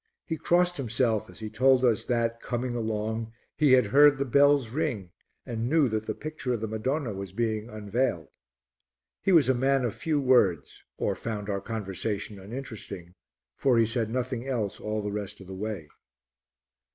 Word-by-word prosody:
He 160 - -2
crossed 175 +2 +2
himself 115 -4 0
as - - -13
he 110 - -4
told 130 +3 +4
us 115 -3 +2
that, 115 -1 0
coming 120 0 -2
along, 110 0 -2 0.2
he 145 -4 +4
had 125 -3 +6
heard 145 +6 +6
the 140 - -1
bells 140 -1 +4
ring 125 - -2 0.3
and 115 0 -3
knew 155 -2 +4
that 110 0 -2
the - - -2
picture 155 -5 -4
of 110 - -6
the 110 - -2
Madonna 115 +3 -2
was 95 -1 -6
being 110 0 -1
unveiled. 105 - -2 0.9
He 195 - +1
was 165 -7 +6
a 130 - +4
man 135 +1 +2
of 115 - -1
few 155 -2 -1
words, 105 - +2
or - - 0
found 105 -2 -4
our 100 0 -2
conversation 105 -1 -4
uninteresting, 100 -5 -8 0.4
for 130 -3 +2
he 115 - +5
said 115 0 -1
nothing 125 +1 -3
else 105 -6 -2
all 105 0 -3
the 105 - -3
rest 105 -1 -5
of 95 - -11
the 95 - -8
way. 100 -4 -5
115 Hz, 175 wpm, -28 LUFS, 105-130 Hz, 0.9 s, had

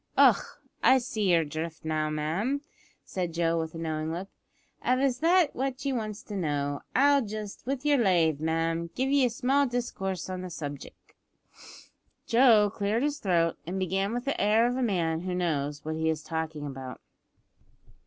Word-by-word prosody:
"Och! - - +4 0.2
I 260 - +6
see 220 -5 -1
yer 170 -2 +4
drift 160 +2 -6
now, 155 -1 0
ma'am," 170 - -1 0.4
said 175 -3 -4
Joe, 165 0 +1
with 160 0 -4
a - - -5
knowing 160 -1 -2
look. 180 +4 -5 0.5
"Av 255 - +2
it's 260 -2 +1
that 340 0 +3
what 270 +1 -3
ye 275 - +1
wants 215 -4 -4
to 210 - -7
know, 145 -5 -1
I'll 280 +1 +5
just, 215 0 -6
with 275 +1 -2
your 290 -2 +4
lave, 170 -8 +3
ma'am, 165 +1 -1
give 265 +1 0
ye 280 -2 +4
a - - +2
small 275 +3 +2
discourse 195 -7 -3
on 185 -1 -4
the 185 - -6
subjic'." 145 -4 -8 1.1
Joe 230 -4 +5
cleared 215 +4 0
his 295 0 -1
throat, 170 -4 +1
and 185 +2 -3
began 190 +2 0
with 245 +2 -3
the 280 - -1
air 215 +3 +4
of 245 +1 0
a 260 - -1
man 170 -8 0
who 180 +1 -3
knows 150 -5 -2
what 155 - -2
he 160 0 +1
is 155 -1 -2
talking 160 -2 -4
about. 135 -2 -7
185 Hz, 180 wpm, -28 LUFS, 160-245 Hz, 1.1 s, I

